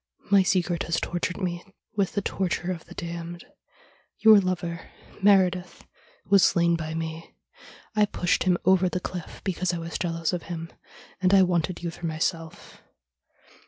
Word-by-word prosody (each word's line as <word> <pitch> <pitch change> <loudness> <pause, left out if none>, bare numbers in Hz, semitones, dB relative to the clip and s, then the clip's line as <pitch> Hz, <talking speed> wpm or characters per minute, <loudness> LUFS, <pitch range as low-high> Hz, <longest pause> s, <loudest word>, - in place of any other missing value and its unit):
My 200 -1 +7
secret 180 -2 +1
has 165 0 0
tortured 175 +1 -3
me 175 -2 -3 0.3
with 200 -3 0
the 205 - -1
torture 185 -2 -1
of 170 -3 -6
the - - -13
damned. 170 0 -6 0.7
Your 220 -2 +7
lover, 175 -3 -3 0.3
Meredith, 185 -2 +2 0.4
was 200 -1 +5
slain 170 -1 +3
by 160 -1 -4
me. 165 0 -6 0.6
I 210 -1 +5
pushed 180 -2 0
him 180 -1 +3
over 185 0 +4
the 180 - -2
cliff 180 -2 -7
because 185 -1 -1
I - - -3
was 165 -1 -5
jealous 165 -1 -1
of 175 - -2
him, 165 -1 -6 0.5
and 185 +1 +4
I 190 - +7
wanted 175 0 -1
you 170 - -2
for 170 +1 -6
myself. 165 0 -4
175 Hz, 160 wpm, -26 LUFS, 170-185 Hz, 0.7 s, My